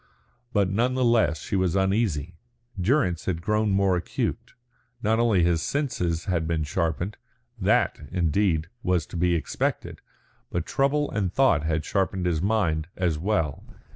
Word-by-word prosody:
But 100 -4 +2
none 120 +5 +1
the 130 -1 +2
less 110 -10 +3
she - - -3
was 95 -2 +1
uneasy. 95 -5 0 0.5
Durrance 90 - +1
had 90 -3 -1
grown 105 +4 +1
more 95 -1 +3
acute. 90 - -3 0.5
Not 110 +2 +2
only 110 -7 +3
his 85 -1 +2
senses 90 - -1
had 85 -4 0
been 80 -2 0
sharpened, 85 +6 -2 0.4
that, - - +2
indeed, 85 -1 +1 0.2
was 90 -6 +1
to - - -11
be 85 0 +2
expected, 80 - -2 0.5
but 85 -1 -2
trouble 145 +2 +1
and 95 -4 -1
thought 95 - +3
had 80 -1 -1
sharpened 95 -2 -1
his 85 -3 0
mind 90 -7 +1
as 85 -4 0
well. 80 -6 -1
90 Hz, 150 wpm, -25 LUFS, 80-105 Hz, 0.5 s, less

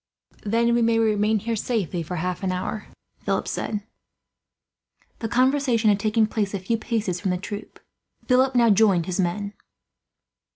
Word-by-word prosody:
"Then 230 +3 +2
we 240 - +2
can 230 0 +3
remain 215 -1 +2
here 225 +3 -2
safely 200 -6 -2
for 165 +2 -5
half 180 +1 -3
an 190 -2 -1
hour," 185 +3 -4 0.3
Philip - - -1
said. 210 -2 -3 1.4
The 225 - -3
conversation 255 -2 +2
had 200 - +1
taken 215 +1 +2
place 210 -2 -2
a - - -2
few 220 +5 -1
paces 215 -6 -2
from 195 - -1
the 180 - 0
troop. 205 +3 -8 0.5
Philip 255 +1 +3
now 235 -2 +5
joined 200 -5 +4
his 185 +1 -3
men. 200 +3 -1
215 Hz, 160 wpm, -24 LUFS, 190-230 Hz, 1.4 s, now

